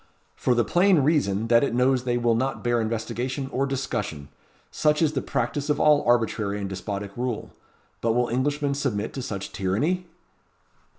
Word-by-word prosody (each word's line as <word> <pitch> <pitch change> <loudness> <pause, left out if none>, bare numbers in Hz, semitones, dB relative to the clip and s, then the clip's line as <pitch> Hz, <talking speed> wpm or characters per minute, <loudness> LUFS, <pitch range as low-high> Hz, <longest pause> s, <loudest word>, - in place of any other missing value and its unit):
"For 125 - +1
the 120 -2 +2
plain 185 - +4
reason, 115 -9 +1
that 115 +1 +5
it 130 - 0
knows 125 0 +2
they 120 -1 +1
will 120 -1 +2
not 130 +4 -1
bear 120 -1 +2
investigation 120 +4 -3
or 135 +2 0
discussion. 105 - -3 0.4
Such 150 -1 +2
is 155 -2 +2
the 135 - -1
practice 140 +6 -2
of 150 0 +1
all 150 -1 +5
arbitrary 110 -4 +1
and 100 - -3
despotic 100 +1 -5
rule. 120 -2 -3 0.5
But 115 -1 +1
will 120 +1 +2
Englishmen 140 +3 0
submit 120 -7 -2
to 135 - -4
such 100 -5 -5
tyranny?" 145 - -1
120 Hz, 170 wpm, -25 LUFS, 110-140 Hz, 0.5 s, that